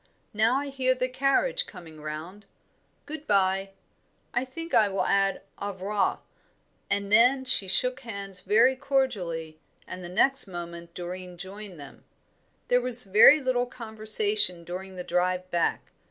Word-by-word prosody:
Now 220 +4 +2
I 280 +1 -2
hear 260 -1 +1
the 255 0 -1
carriage 275 - +1
coming 165 -5 -12
round. 165 +7 -8 0.6
Good 305 0 -8
bye. 195 -1 +2 0.6
I 245 - +1
think 330 +6 -8
I 210 -2 +5
will 195 - -1
add 195 -1 +1 0.2
au 200 0 -4
revoir;" 195 +2 -1 0.7
and 200 0 -1
then 250 +5 +5
she 220 -6 +4
shook 250 +7 +2
hands 200 -5 -7
very 230 +7 +3
cordially, 200 - -2 0.3
and 185 0 -8
the 175 - -7
next 270 +9 +2
moment 170 -2 -8
Doreen 180 0 -7
joined 190 0 -9
them. 140 - -12 0.6
There 245 0 +3
was 250 0 +1
very 215 +10 +7
little 255 -2 0
conversation 220 - 0
during 185 +2 -7
the 180 - -6
drive 180 +1 -1
back. 170 -1 -1
200 Hz, 145 wpm, -27 LUFS, 180-255 Hz, 0.7 s, very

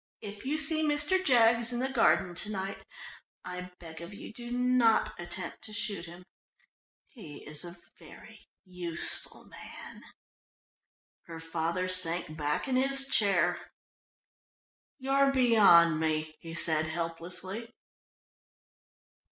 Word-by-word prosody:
If 205 +1 -9
you 300 +3 0
see 310 +1 +3
Mr. 300 +5 +2
Jaggs 235 -4 +4
in 240 - -3
the 260 - 0
garden 230 -8 +2
to 210 +5 -3
night, 195 -1 -5 0.6
I 180 0 -6
beg 165 -1 -11
of 170 +4 -9
you 205 - -10
do 240 +1 -9
not 245 -2 +2
attempt 175 +1 -7
to 215 - -9
shoot 205 -4 -3
him. 175 +1 -12 0.8
He 165 - -12
is 150 +2 -3
a 175 0 -9 0.2
very - - -15 0.2
useful 180 -3 -4
man." - - -11 1.3
Her 165 -1 -8
father 165 +2 -2
sank 175 -3 +1
back 150 - -2
in 255 -1 +1
his 270 +1 +3
chair. 195 -5 +2 1.4
"You're 275 0 +2
beyond 205 - +5
me," 155 -1 -1
he 165 0 -8
said, 160 -2 +2
helplessly. 175 +7 -5
190 Hz, 120 wpm, -30 LUFS, 170-245 Hz, 1.4 s, beyond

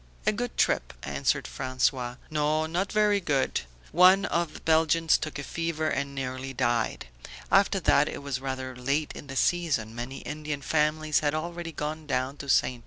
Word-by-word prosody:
"A - - +4
good 245 +3 -4
trip," - - +1
answered 70 0 0
François. 130 -1 -1
"No, 155 +1 +1
not 175 +5 -2
very 210 -1 +3
good. 140 - 0 0.3
One 185 +4 +6
of 170 -4 -1
the - - -7
Belgians 160 0 +3
took 155 -1 -3
a 145 - -5
fever 165 0 -2
and 140 -1 -2
nearly 130 0 -4
died. 120 - 0 0.5
After 195 0 +4
that 150 -2 +4
it - - -7
was 135 -2 -3
rather 130 -1 -4
late 140 +5 -1
in - - -10
the 135 - -7
season; 140 -9 +1
many 120 +3 -6
Indian 150 -2 -5
families 155 0 +2
had 150 0 0
already 170 +1 -4
gone 155 0 -5
down 130 0 -1
to 140 - -8
Ste. 125 -2 +3
150 Hz, 175 wpm, -27 LUFS, 130-165 Hz, 0.5 s, One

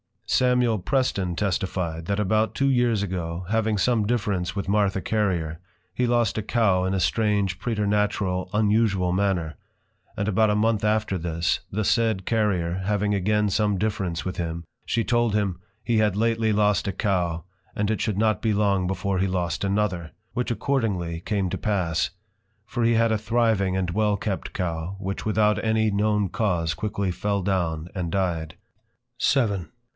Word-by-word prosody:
Samuel 125 -3 +2
Preston 95 -5 0
testify'd, 90 -4 -2
that 100 +3 -1
about 110 +2 +1
two 140 0 +2
years 120 -5 +2
ago, 90 -2 -4
having 110 -1 +1
some 110 0 +2
difference 100 -6 -1
with 100 -1 -3
Martha 100 -1 +2
Carrier, 90 -8 -1 0.3
he 125 +3 0
lost 120 -3 +1
a - - 0
Cow 100 -4 +2
in 95 +1 0
a - - 0
strange 100 0 +1
Preternatural 105 -4 0
unusual 105 -3 +2
manner; 90 -6 0 0.6
and 100 - -1
about 110 +1 +3
a 105 - +2
month 110 0 +1
after 105 -2 +1
this, 85 0 0
the 110 +2 -2
said 110 -3 +1
Carrier, 95 -6 0
having 105 0 +1
again 105 +2 +1
some 105 0 +1
difference 100 -5 -2
with 95 - -4
him, 85 -1 -3 0.2
she 115 - 0
told 120 -2 +1
him; 100 -4 0 0.2
He 115 0 +1
had 105 -3 +2
lately 115 0 +1
lost 105 -1 +2
a 100 - -1
Cow, 90 -5 -1 0.3
and 105 +1 0
it 110 - -1
should 105 -4 -1
not 110 -2 +2
be 110 -2 +1
long 100 -3 +2
before 95 0 -1
he 95 - +2
lost 90 -1 -2
another; 95 -4 -1 0.2
which 125 - -1
accordingly 105 -10 -1
came 100 +1 -1
to - - -2
pass; 90 -7 0 0.6
for 120 - -2
he 115 0 +4
had 115 0 +3
a 110 - +2
thriving 110 -4 +1
and 90 -2 -1
well 105 +1 +1
kept 100 -1 -4
Cow, 85 0 -3
which 95 0 -4
without 105 0 +2
any 110 -1 +2
known 105 -1 +1
cause 85 -8 0
quickly 100 +2 -2
fell 100 +2 -1
down 85 -4 -1
and 90 -4 -3
dy'd. 85 -4 -1 0.7
VII. 105 -10 +2
100 Hz, 165 wpm, -25 LUFS, 90-110 Hz, 0.7 s, he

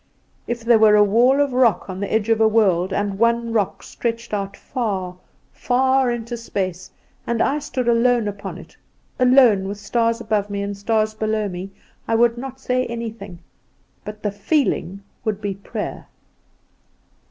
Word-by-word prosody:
If 235 -1 -4
there 230 -1 +5
were 215 -1 +6
a 210 - +6
wall 240 +7 +4
of 285 -2 +1
rock 250 -4 +2
on 185 -1 -6
the 200 - -3
edge 220 0 0
of 225 -1 +3
a 220 - +6
world, 195 -5 +2
and 200 0 -2
one 235 0 +1
rock 210 -4 -1
stretched 230 -1 -4
out 200 -1 -3
far, 195 -8 -3 0.4
far 260 +1 +2
into 240 0 -3
space, 185 -5 -4 0.4
and 235 -1 -1
I 285 +5 +1
stood 260 -4 -3
alone 235 -1 +3
upon 205 0 -6
it, - - -14 0.4
alone, 250 -6 +5
with 200 +1 -5
stars 230 +3 0
above 215 -3 -1
me, 200 0 -3
and 200 0 -4
stars 215 +1 0
below 215 -1 -1
me, 185 0 -6 0.4
I 225 - +1
would 235 0 +3
not 265 +1 -7
say 255 -1 -1
anything; 225 -6 -7 0.6
but 210 0 -9
the 205 - 0
feeling 200 - -1 0.2
would 215 -2 -2
be 205 -2 -3
prayer." 195 +1 -6
220 Hz, 165 wpm, -21 LUFS, 200-240 Hz, 0.6 s, were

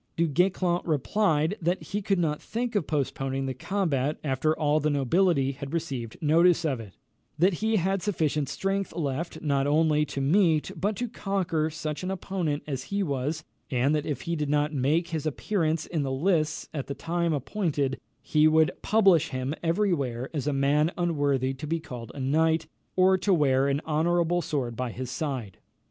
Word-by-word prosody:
Du 170 0 +2
Guesclin 180 +3 +1
replied, 160 +2 +1
that 175 +3 +1
he 205 +1 -3
could 195 0 +1
not 155 -4 0
think 235 +1 -3
of 205 -8 0
postponing 135 -2 -1
the 130 - -2
combat 150 -2 -1
after 150 +2 0
all 150 0 +2
the 150 0 +1
nobility 145 +1 +2
had 140 +2 -8
received 135 -9 -4
notice 170 +2 +4
of 135 -6 0
it; 105 -4 -10 0.4
that 180 +5 +4
he 220 0 +2
had 195 0 +1
sufficient 155 -7 0
strength 195 0 -2
left 155 +1 -3
not 140 -2 +1
only 150 0 +3
to 140 - -4
meet, 160 +2 +3
but 205 +2 -1
to 245 +5 -2
conquer 185 -7 -1
such 155 -1 -4
an 185 - -3
opponent 180 -5 -2
as 135 -3 -4
he 200 0 -1
was; 145 0 -2 0.3
and 130 +2 +2
that 150 -1 -1
if 140 -4 -3
he 170 - -2
did 150 -2 -2
not 150 +1 +1
make 150 +6 +1
his 160 -2 -2
appearance 160 0 -1
in 160 -4 -2
the 135 -1 -2
lists 155 +2 0
at 140 -4 -4
the 140 - -4
time 170 +2 -1
appointed, 145 - -1 0.2
he 155 0 +4
would 155 0 +4
publish 195 -7 +4
him 130 0 -3
every 180 +4 +2
where 130 -4 -3
as 150 -2 -2
a - - +2
man 145 +3 +2
unworthy 145 -6 +1
to 135 +3 -7
be 165 +2 0
called 125 -7 -8
a - - -7
knight, 160 +4 +2 0.3
or 185 0 +4
to 195 +2 +1
wear 140 -5 +3
an 140 0 +1
honourable 170 +2 +1
sword 130 -7 -2
by 125 +1 -2
his 125 +2 -6
side. 130 - -4
155 Hz, 185 wpm, -27 LUFS, 140-175 Hz, 0.4 s, notice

